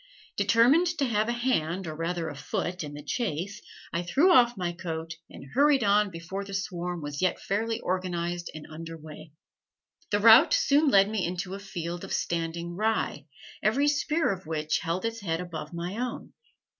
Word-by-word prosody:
Determined 260 +10 +4
to 280 - +1
have 220 -2 +1
a - - +2
hand, 195 -8 0
or 155 -1 -5
rather 165 +1 -2
a 145 - -6
foot, 170 +5 -3
in 145 -1 -7
the 145 - -8
chase, 195 - -3 0.3
I 170 - 0
threw 280 - +3
off 240 -6 +5
my 175 -2 -1
coat 165 -2 -5 0.2
and - - -11
hurried 280 -2 +4
on, 205 0 +3
before 185 +3 -6
the 195 0 -6
swarm 175 -3 -3
was 145 +1 -5
yet 185 - +1
fairly 220 +3 -1
organized 175 -1 -2
and 155 - -8
under 165 +1 -8
way. 155 0 -11 0.8
The 205 - +2
route 225 +2 +8
soon 290 +2 +3
led 195 -4 +6
me 210 -3 -1
into 180 +2 -3
a 195 - -5
field 175 -3 -5
of - - -5
standing 170 0 -2
rye, 215 -8 -1 0.3
every 260 +8 +2
spear 300 +1 +1
of 185 -4 -6
which 155 -1 -1
held 175 +4 -2
its 230 0 -2
head 165 -4 -1
above 175 -3 -6
my 175 +3 -4
own. 250 0 -4
180 Hz, 180 wpm, -28 LUFS, 165-220 Hz, 0.8 s, route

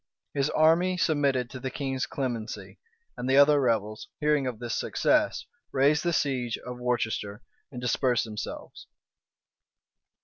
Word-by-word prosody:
His 140 0 +1
army 170 +4 +3
submitted 140 -7 +1
to 130 - -7
the 130 +1 -3
king's 135 -1 -3
clemency; 120 -5 -5 0.4
and 125 - -4
the 135 - +4
other 145 0 +6
rebels, 110 -3 -1
hearing 150 -3 +2
of 125 -3 -4
this 120 0 -4
success, - - +1 0.3
raised 145 +3 +3
the 175 - 0
siege 130 -7 0
of 125 0 -8
Worcester, 115 -3 -2 0.3
and 125 - -7
dispersed 125 0 +1
themselves. 105 -2 -7
130 Hz, 135 wpm, -27 LUFS, 120-145 Hz, 0.4 s, other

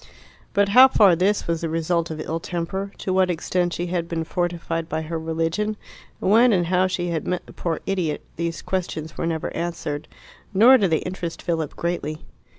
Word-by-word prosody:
But 200 0 +3
how 255 +5 +9
far 205 -8 +5
this 195 +5 +1
was 165 -1 -1
the 165 - -2
result 165 +1 0
of 160 -1 -5
ill 160 +1 -3
temper, 180 +4 -4
to 185 - -2
what 185 -1 +3
extent 175 +1 0
she 175 - -2
had 175 -1 -2
been 165 -1 -2
fortified 165 -1 -2
by 160 +1 -2
her 165 +1 -4
religion, 165 +7 -1 0.4
when 230 +5 +5
and 180 -4 +2
how 185 +2 +2
she 175 -1 -2
had 165 -2 -2
met 180 -1 -2
the - - -14
poor 165 -2 -3
idiot 180 -6 -2
these 170 0 -3
questions 160 -4 -3
were 165 - -2
never 160 -2 -3
answered, 165 -4 -3 0.5
nor 250 +6 +8
did 195 -4 +2
they 160 - +1
interest 180 -2 -5
Philip 160 -4 -2
greatly. 165 -3 -3
170 Hz, 190 wpm, -23 LUFS, 165-185 Hz, 0.5 s, how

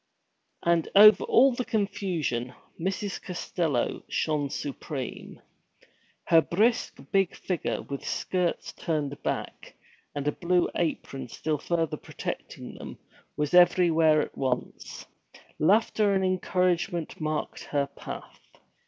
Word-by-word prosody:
And 170 -1 +2
over 210 0 +9
all 265 +2 +5
the 250 - -2
confusion, 185 - -2 0.2
Mrs. 190 +3 -3
Costello 165 -7 -2
shone 150 -3 0
supreme. 140 -1 -6 0.9
Her 165 -1 +6
brisk, 220 +9 +1
big 195 -2 +2
figure, 180 -5 -3
with 140 -1 -6
skirts 180 -2 -2
turned 145 -3 -3
back, - - -4 0.4
and 145 0 -3
a - - +3
blue 175 +3 +1
apron 135 -5 -3
still 150 +4 -2
further 165 0 -1
protecting - - -7
them, - - -8 0.4
was 150 +1 -1
everywhere 165 -3 +5
at - - -9
once; 130 -2 -3 0.5
laughter 205 +3 +3
and 190 0 +1
encouragement 180 -2 0
marked 155 0 -3
her 140 -1 0
path. 140 - -9
170 Hz, 110 wpm, -27 LUFS, 150-190 Hz, 0.9 s, over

